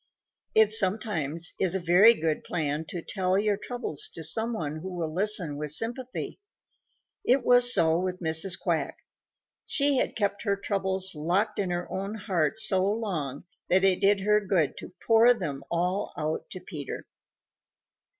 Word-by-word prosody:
It 220 -1 +5
sometimes 185 -7 +1
is 190 0 +1
a - - 0
very 185 +7 +6
good 160 -3 -2
plan 155 -2 -3
to 170 +1 -7
tell 185 -1 -1
your 205 0 +1
troubles 235 - -5
to 165 - -7
some 220 +9 -1
one 155 -9 -4
who 180 +4 -7
will 165 -3 -4
listen 185 -5 +2
with 150 0 -2
sympathy. 245 - -4 0.8
It 255 +2 +2
was 245 0 +6
so 165 -6 +3
with 185 0 -3
Mrs. 160 +2 0
Quack. - - -2 0.7
She 280 -2 +2
had - - -1
kept 200 -2 -1
her 200 -3 0
troubles 190 -1 +1
locked 175 +8 -1
in 195 -3 -1
her 175 0 -3
own 195 +3 -4
heart 190 -3 -1
so 190 -4 +3
long 190 - -3 0.3
that 185 +1 +3
it 190 -1 +2
did 200 0 +3
her 210 +1 +3
good 185 -7 0
to - - -9
pour 230 +2 +5
them 145 -9 -5
all 180 +4 -2
out 155 0 -3
to 185 - -8
Peter. 150 -8 -7
190 Hz, 160 wpm, -27 LUFS, 165-210 Hz, 0.8 s, very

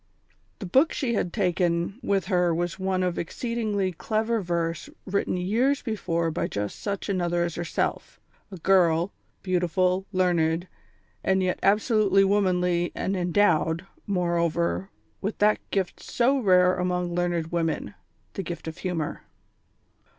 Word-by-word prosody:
The 200 - -7
book 265 - +3
she 255 -5 -1
had 180 -5 -1
taken 175 0 0
with 200 -5 0
her 180 -3 +2
was 175 +2 -2
one 190 -1 0
of 180 -1 -1
exceedingly 210 0 -2
clever 220 +5 -1
verse 170 -2 -2 0.2
written 195 -1 -1
years 235 +10 +1
before 170 -7 -1
by 160 - -1
just 105 0 -4
such 200 -1 -3
another 175 -3 0
as 170 -1 -2
herself; 175 +1 -3 0.3
a 190 - -7
girl, 175 0 +3 0.3
beautiful, 185 +1 +1
learned, 175 -2 +1 0.6
and 190 0 +2
yet 180 0 0
absolutely 205 -1 +3
womanly, 180 -3 +2
and 195 - -1
endowed, 175 -2 +2 0.2
moreover, 170 -1 0 0.3
with 205 +2 -3
that 210 +1 +3
gift 190 -3 -1
so 265 +3 +1
rare 185 -4 +4
among 180 -1 -1
learned 175 -2 -1
women, 165 -10 -1 0.4
the - - -3
gift 175 -2 -6
of 160 +2 -6
humour. 170 -5 -3
180 Hz, 135 wpm, -26 LUFS, 170-200 Hz, 0.6 s, rare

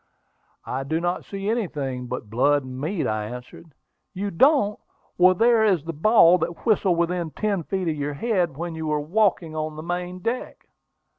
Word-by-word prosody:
"I 130 +2 -3
do 160 +4 -1
not 175 +1 -2
see 195 0 -6
anything 145 - -2
but 125 -3 -5
blood 140 +6 +2
and 130 0 -8
meat," 165 +4 -2
I 110 -1 -1
answered. 125 +8 -9 0.5
"You 200 +2 -3
don't! 260 - +3 0.4
Well, 185 +1 +5
there 230 +2 +4
is 190 -8 +2
the 165 +1 -5
ball 180 +1 +5
that 170 +1 -4
whistled 200 -6 +2
within 170 0 0
ten 200 +2 -1
feet 185 +2 -3
of 160 - 0
your 145 0 -3
head 175 - 0
when 170 +1 -4
you 160 -1 -5
were 150 -1 0
walking 170 0 0
on 155 0 -3
the 155 - -7
main 180 +1 -4
deck." 230 +7 -4
170 Hz, 180 wpm, -24 LUFS, 145-195 Hz, 0.5 s, Well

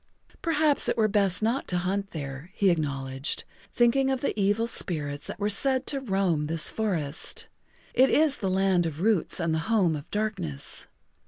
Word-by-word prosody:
"Perhaps 310 -4 +2
it - - 0
were 220 -1 +4
best 200 -2 +1
not 235 +5 0
to 180 - 0
hunt 195 +3 -1
there," 140 0 -6
he 195 -2 +4
acknowledged, 140 -4 -2 0.3
thinking 260 +3 +3
of 265 -1 -1
the - - 0
evil 205 +2 +2
spirits 150 -10 -2
that - - -6
were 205 - -1
said 260 +6 +1
to 275 - 0
roam 190 - 0
this 160 +1 +1
forest. 170 -10 -2 0.4
"It 265 +1 +5
is 300 -2 +3
the 195 - -2
Land 185 -2 +2
of 160 0 -6
Roots 210 -4 +1
and 165 -2 0
the 160 - +1
Home 190 -8 +3
of 145 -1 -8
Darkness. 190 -10 -3
195 Hz, 175 wpm, -27 LUFS, 160-225 Hz, 0.4 s, It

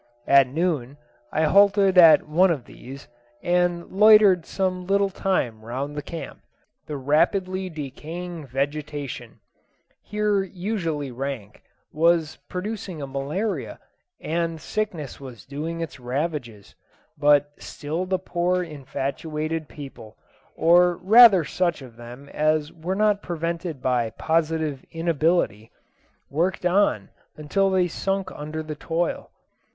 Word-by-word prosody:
At 140 -1 +6
noon 145 -3 -2 0.3
I 155 - +1
halted 195 +3 +4
at 165 -4 +7
one 175 +5 +4
of 145 -8 -2
these, 135 +3 -11 0.4
and 175 -1 +1
loitered 205 -3 +6
some 185 -2 -2
little 200 0 +2
time 125 - -1
round 130 +5 -4
about - - -11
the 145 - -3
camp. 165 - -7 0.5
The 150 - -4
rapidly 185 +7 +1
decaying 160 +2 -7
vegetation 140 -2 -4 0.6
here 210 -1 0
unusually 175 - -3
rank 125 -5 -6 0.3
was 160 0 +2
producing 185 -2 -5
a 140 - -4
malaria, 140 +11 -3 0.4
and 165 0 -2
sickness 170 -6 -4
was 125 -7 -11
doing 160 +4 -5
its 160 -4 -6
ravages; 125 -4 -4 0.4
but 145 0 +3
still 160 +5 -4
the 185 0 +1
poor 180 0 -1
infatuated 150 +1 -4
people, 135 -7 -11 0.4
or 175 +1 +4
rather 205 -3 +7
such 170 -2 -1
of 120 -3 -13
them 120 +4 -11
as 155 0 0
were 175 +4 -4
not 210 0 +2
prevented 170 -4 -4
by 125 -3 +1
positive 160 +1 -1
inability, 165 - 0 0.6
worked 175 +5 -1
on 195 +3 +2 0.3
until 195 +6 +1
they 185 -2 +2
sunk 195 +2 -2
under 155 0 -6
the 155 0 -6
toil. 165 +3 -2
160 Hz, 120 wpm, -24 LUFS, 140-180 Hz, 0.6 s, at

